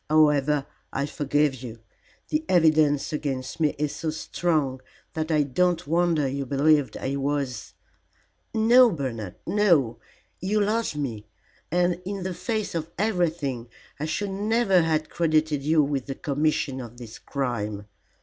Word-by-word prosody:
"However, 150 -2 +3 0.3
I 140 - -1
forgive 145 -2 0
you. 120 -3 -7 0.5
The 305 +1 0
evidence 155 -4 +3
against 135 -2 -3
me 155 -2 +2
is 150 0 -2
so 160 - -3
strong 155 -4 -1 0.3
that 160 0 -2
I 155 -2 +3
don't 175 +5 +1
wonder 165 -2 +2
you 135 0 -3
believed 145 +1 +2
I 135 +1 -2
was 140 -5 -2 0.4
" - - -41 0.2
"No, 250 0 +8
Bernard, 120 - -4
no. 165 - +2 0.4
You 200 +4 0
loved 215 -3 0
me, 115 -8 -4 0.4
and 175 0 +1
in 195 0 -4
the 185 0 -3
face 220 +3 -3
of 165 -1 -3
everything 165 - -1 0.3
I 150 - -2
should 195 +5 -2
never 205 -1 +2
have 155 -1 0
credited 155 -3 +1
you 155 +2 +3
with 140 -2 -2
the 135 - -4
commission 145 -2 -1
of 120 -1 -10
this 120 -3 -10
crime. 105 -7 -3
150 Hz, 145 wpm, -25 LUFS, 135-175 Hz, 0.5 s, No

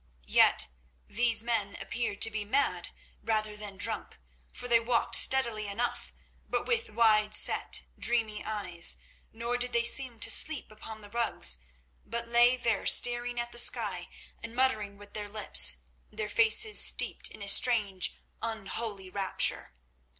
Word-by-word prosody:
Yet - - +5 0.4
these 230 -1 +1
men 220 -4 -2
appeared 205 +1 -5
to 225 - +6
be 215 -1 -4
mad 265 +7 -1 0.3
rather 215 -1 -2
than 205 -2 -8
drunk, 215 +2 -4 0.3
for 245 - -7
they 235 -1 +4
walked 235 +1 -2
steadily 235 -5 +5
enough, 230 +5 -3 0.4
but - - -2
with 465 -1 -2
wide 215 -2 +2
set, - - +2 0.2
dreamy 225 -3 -1
eyes; 180 -6 0 0.3
nor 235 +2 -4
did 245 0 -3
they 235 0 +1
seem 245 -1 +2
to - - +2
sleep 315 -8 +2
upon 215 0 -11
the 205 - -13
rugs, 225 - +3 0.4
but 235 0 -6
lay 240 +2 +3
there 230 -4 -2
staring 240 0 +2
at 240 0 -5
the 240 - -4
sky - - 0 0.3
and 230 - -9
muttering 215 -6 -1
with 205 0 -15
their 210 -1 -6
lips, 65 - +3 0.3
their 210 -1 -6
faces 230 - +2
steeped - - 0
in 205 - -12
a - - -7
strange, 200 -3 +2 0.3
unholy 215 -3 -5
rapture. 195 -1 -2
225 Hz, 150 wpm, -28 LUFS, 205-240 Hz, 0.4 s, to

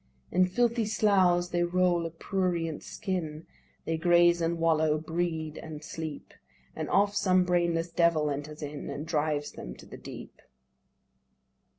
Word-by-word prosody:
"In 185 +1 +4
filthy 235 +3 +1
sloughs 185 -5 +3
they 175 -1 0
roll 175 -1 +2
a - - -6
prurient 170 -2 -2
skin, 165 -5 -4 0.4
They 165 0 -1
graze 175 +1 +4
and 165 +1 0
wallow, 160 -2 +2
breed 160 -1 -3
and 155 -1 -8
sleep; 155 -2 -7 0.4
And - - -4
oft 200 +1 +3
some 185 -2 +3
brainless 170 -1 +1
devil 165 -3 +2
enters 150 +2 -5
in, 145 0 -6
And 150 - -5
drives 150 -2 -1
them - - -8
to - - -14
the - - -10
deep." - - -10
170 Hz, 145 wpm, -29 LUFS, 155-180 Hz, 0.4 s, In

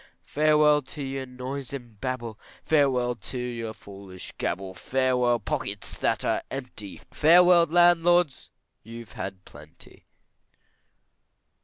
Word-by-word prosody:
Farewell 150 0 +3
to 145 +2 -8
your 135 0 -4
noise 130 +1 -6
and 120 -6 -9
babble, 120 -4 -4 0.2
Farewell 130 -5 +2
to 120 +3 -8
your 120 -2 -4
foolish 100 -3 -11
gabble, 95 +1 -3
Farewell 125 +4 +1
pockets - - -4
that - - 0
are - - +1
empty, 125 -7 -6
Farewell 170 +2 +6
landlords, 175 -2 +3 0.3
you've 115 +1 -11
had 95 0 -7
plenty. 75 +3 -16
125 Hz, 110 wpm, -26 LUFS, 110-150 Hz, 0.3 s, Farewell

